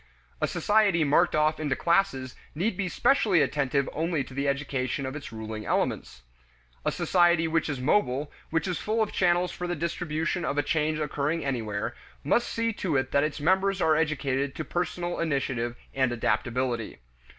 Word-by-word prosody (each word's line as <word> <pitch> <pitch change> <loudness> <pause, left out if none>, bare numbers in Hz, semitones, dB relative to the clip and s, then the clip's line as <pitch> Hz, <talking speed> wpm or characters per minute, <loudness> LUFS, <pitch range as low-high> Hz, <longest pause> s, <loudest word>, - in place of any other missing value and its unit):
A - - +2
society 205 -6 +3
marked 155 +4 +3
off 155 +1 +2
into 145 -4 0
classes 170 -8 +1 0.2
need 195 +9 0
he 190 -2 0
specially 215 - +3
attentive 140 -1 0
only 160 -2 0
to 130 - -12
the 140 +1 -1
education 140 -1 -1
of 130 +2 -4
its 150 - -7
ruling 110 -1 -6
elements. - - -1 0.6
A - - +1
society 175 -2 +3
which 160 0 0
is 140 -3 -3
mobile, 145 -1 +1 0.2
which 165 +1 0
is 180 - -2
full 220 +1 +1
of 215 - -4
channels 175 0 +2
for 180 - -5
the 175 - -1
distribution 165 +1 -2
of 140 - -1
a 145 - +3
change 155 +1 0
occurring 150 +1 -1
anywhere, 110 -6 -2 0.3
must 240 - +2
see 230 0 -1
to 170 -8 -1
it 130 0 -1
that 140 - +3
its 150 -1 -2
members 190 +5 +2
are 160 -3 +3
educated 140 -3 0
to 155 - -4
personal 175 0 -2
initiative 130 -6 -1 0.2
and 130 -2 +1
adaptability. 120 0 -1
155 Hz, 175 wpm, -27 LUFS, 135-175 Hz, 0.6 s, society